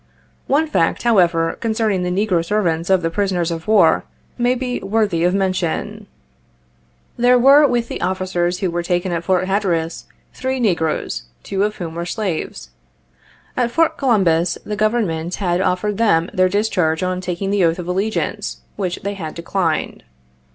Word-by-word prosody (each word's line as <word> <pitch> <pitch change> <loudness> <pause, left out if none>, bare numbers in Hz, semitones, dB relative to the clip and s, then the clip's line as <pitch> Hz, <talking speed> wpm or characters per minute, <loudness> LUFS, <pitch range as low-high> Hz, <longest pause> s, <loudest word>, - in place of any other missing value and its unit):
One 295 +4 +3
fact, 170 - 0
however, 170 -8 +3
concerning 220 -4 0
the 180 - -1
negro 185 -2 +1
servants 170 -3 0
of 190 -2 +3
the 165 - 0
prisoners 180 -3 0
of 165 +2 -5
war, 215 0 +4 0.3
may 245 +1 +1
be 250 -1 -3
worthy 200 -4 0
of 180 +2 +2
mention. 195 +2 -2 1.1
There 245 +1 +5
were 275 +4 +7
63 275 - +1
with 240 -1 0
the - - -6
officers, 180 -1 -1
who 185 -3 0
were 175 +1 -1
taken 175 +1 -1
at 170 -1 -2
Fort 185 0 +1
Hatter 195 -2 +1
as, 165 0 -4 0.3
three 260 0 -2
negroes, 160 - -1 0.2
two 195 -1 -2
of 210 +1 -1
whom 165 -3 -6
were 170 +1 -4
slaves. 180 - -4 0.8
At 245 -2 +1
Fort 330 +7 +2
Columbus 185 - +2
the 210 - -3
Government 200 -6 0
had 180 -2 0
offered 195 +3 -1
them 170 -7 +2
their 185 -2 +3
discharge 185 -5 0
on 185 0 -1
taking 185 +2 -3
the 200 -2 +2
oath 165 0 +2
of 175 -1 -6
allegiance, 195 +5 -2 0.2
which 185 -3 -2
they 200 +1 -2
had 160 -6 -6
declined. 170 -1 -2
185 Hz, 165 wpm, -19 LUFS, 170-215 Hz, 1.1 s, were